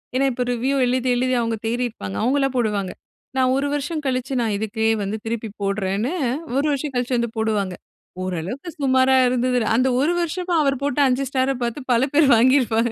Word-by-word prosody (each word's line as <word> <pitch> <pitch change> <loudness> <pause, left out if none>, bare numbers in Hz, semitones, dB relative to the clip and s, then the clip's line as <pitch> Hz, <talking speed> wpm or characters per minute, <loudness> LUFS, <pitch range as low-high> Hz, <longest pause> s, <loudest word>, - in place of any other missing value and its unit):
ஏனா 270 +2 +2
இப்ப 250 0 -2
ரிவ்யூ 260 +4 0
எழுதி 255 +1 0
எழுதி 255 +1 0
அவுங்க 230 -1 -1
தேறியிருப்பாங்க. 225 - -3
அவுங்கலாம் 270 +2 +1
போடுவாங்க, 205 -5 0 0.5
நான் 255 0 +3
1 275 +1 0
வருஷம் 300 +2 -3
கழிச்சி 260 0 -1
நான் 220 -3 0
இதுக்கே 220 +1 -1 0.2
வந்து 205 +3 -3
திருப்பி 225 0 -3
போடறேன்னு 200 +4 -1 0.4
1 280 +2 +1
வருஷம் 285 0 -2
கழிச்சி 250 0 -1
வந்து 235 0 -1
போடுவாங்க. 210 -4 -1 0.5
ஓரளவுக்கு 185 - -4
சுமாரா 260 0 +4
இருந்தது. 250 0 +1 0.2
அந்த 255 +3 +3
1 315 +5 +2
வருஷமா 350 +1 -2
அவர் 275 -2 +2
போட்ட 285 0 -1
5 260 +1 +1
ஸ்டார 265 0 +1
பார்த்து 235 +4 -2
பல 240 +1 +3
பேர் 295 0 +5
வாங்கிருபாங்க. 235 -1 +3
250 Hz, 170 wpm, -22 LUFS, 225-270 Hz, 0.5 s, பேர்